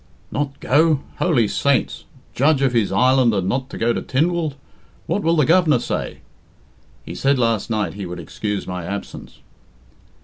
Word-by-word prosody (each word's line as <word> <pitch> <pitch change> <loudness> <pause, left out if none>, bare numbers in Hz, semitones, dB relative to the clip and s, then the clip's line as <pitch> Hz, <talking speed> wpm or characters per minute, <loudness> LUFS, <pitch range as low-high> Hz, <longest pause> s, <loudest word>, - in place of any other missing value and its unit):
"Not 140 -1 -3
go? 150 +1 +3 0.2
Holy 135 -11 +2
saints! 140 +2 0 0.3
Judge 140 +1 +2
of 130 -2 +2
his 115 -4 +1
island 125 +2 +3
and 95 -2 -1
not 130 +5 -2
go 115 +1 0
to - - -3
Tynwald! 160 +1 0 0.5
What 185 +5 -1
will 165 -2 +2
the 150 -4 +3
Governor 165 -3 +4
say?" - - -4 0.8
"He - - -7
said 135 0 +1
last 115 -4 0
night 110 -2 -1
he 100 -2 -6
would 90 0 -7
excuse 105 +5 -4
my 90 -1 -5
absence." 100 +4 -7
130 Hz, 160 wpm, -20 LUFS, 105-150 Hz, 0.8 s, Governor